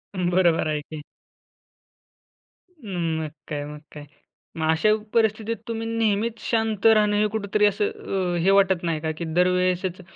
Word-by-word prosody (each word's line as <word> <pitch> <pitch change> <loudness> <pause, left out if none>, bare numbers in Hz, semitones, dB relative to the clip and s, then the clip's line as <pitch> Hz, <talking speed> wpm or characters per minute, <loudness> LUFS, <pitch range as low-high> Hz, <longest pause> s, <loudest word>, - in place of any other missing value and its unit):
बरोबर 175 -3 +2
आहे 150 -1 -1
की. 155 -1 -7 1.7
अं, 185 - -4
मग 155 -2 -4 0.2
काय, 145 -2 -4
मग 150 0 -9
काय. 150 -1 -9 0.5
मग 160 -1 0
अशा 160 +7 +2 0.2
परिस्थितीत 220 0 +1
तुम्ही 225 0 -4
नेहमीच 225 0 0
शांत 220 -3 0
राहणं 215 -2 +5
हे 210 +1 +3
कुठेतरी 210 0 +1
असं 210 - +1 0.5
अ, - - 0
हे 195 - +4
वाटत 190 -3 +2
नाही 165 -2 -1
का? 160 0 -2
की 170 - -4
दरवेळेसच 180 0 +1
190 Hz, 150 wpm, -24 LUFS, 165-220 Hz, 1.7 s, राहणं